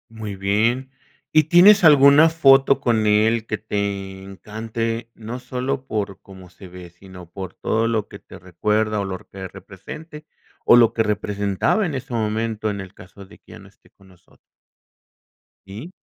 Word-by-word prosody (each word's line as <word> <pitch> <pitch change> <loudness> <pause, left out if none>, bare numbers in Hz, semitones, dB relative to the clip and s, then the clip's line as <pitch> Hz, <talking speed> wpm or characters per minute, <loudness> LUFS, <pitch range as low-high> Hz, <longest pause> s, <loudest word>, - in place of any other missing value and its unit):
Muy 110 -3 -7
bien. 115 +7 -1 0.4
¿Y 155 -1 +4
tienes 180 +5 +6
alguna 145 +1 +7
foto 140 -4 +4
con 115 -5 +1
él 110 +2 +2
que 110 - -3
te 100 -2 -4
encante? 115 +4 -5
No 115 +3 -7
solo 130 +2 -4
por 100 -3 -4
cómo 95 -2 -15
se 90 +2 -14
ve, 90 -1 -12
sino 90 0 -15
por 95 -2 -8
todo 115 +1 -1
lo 110 -2 -2
que - - -11
te - - -14
recuerda 105 +4 -1
o 100 - -3
lo 95 -1 -5
que 95 -1 -8
represente 125 - -12 0.4
o - - +7
lo 120 -2 +5
que 115 - +1
representaba 105 - -1
en 160 -6 -4
ese 130 +1 -7
momento, 110 -1 -2
en 100 -1 -4
el 95 0 -11
caso 100 +1 -15
de 95 - -18
que - - -17
ya 110 - -12
no 100 -1 -16
esté 100 - -28
con 95 -1 -23
nosotros. 90 -2 -24 1.3
Sí. 110 - -10
110 Hz, 170 wpm, -21 LUFS, 95-125 Hz, 1.3 s, alguna